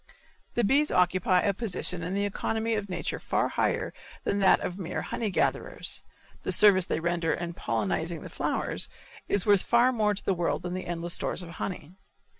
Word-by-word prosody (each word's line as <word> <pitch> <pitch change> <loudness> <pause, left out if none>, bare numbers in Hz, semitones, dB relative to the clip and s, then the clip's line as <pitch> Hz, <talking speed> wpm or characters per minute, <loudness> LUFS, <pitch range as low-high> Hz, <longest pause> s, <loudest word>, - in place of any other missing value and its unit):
The 240 - +2
bees 280 +8 +4
occupy 180 0 +3
a 200 - +1
position 185 -4 0
in 180 +4 -3
the 200 0 +1
economy 220 +3 -1
of 205 -2 -2
nature 180 - -3
far - - 0
higher - - 0 0.3
than 200 - 0
that 195 - +5
of 180 +2 -4
mere 175 - -3
honey 225 - -2
gatherers. 190 - -1 0.4
The - - -2
service 195 -4 +6
they 155 - -1
render 170 -1 0
in 170 0 -5
pollenizing 135 - -2
the - - -8
flowers - - -1 0.4
is 200 - +2
worth 205 -3 +5
far 240 +2 +4
more 210 -3 +1
to - - -8
the 195 - +2
world 175 -1 -1
than 180 0 -3
endless 175 -2 -2
stores 180 - -1
of 170 - -9
honey. 180 -3 -5
185 Hz, 185 wpm, -28 LUFS, 175-205 Hz, 0.4 s, service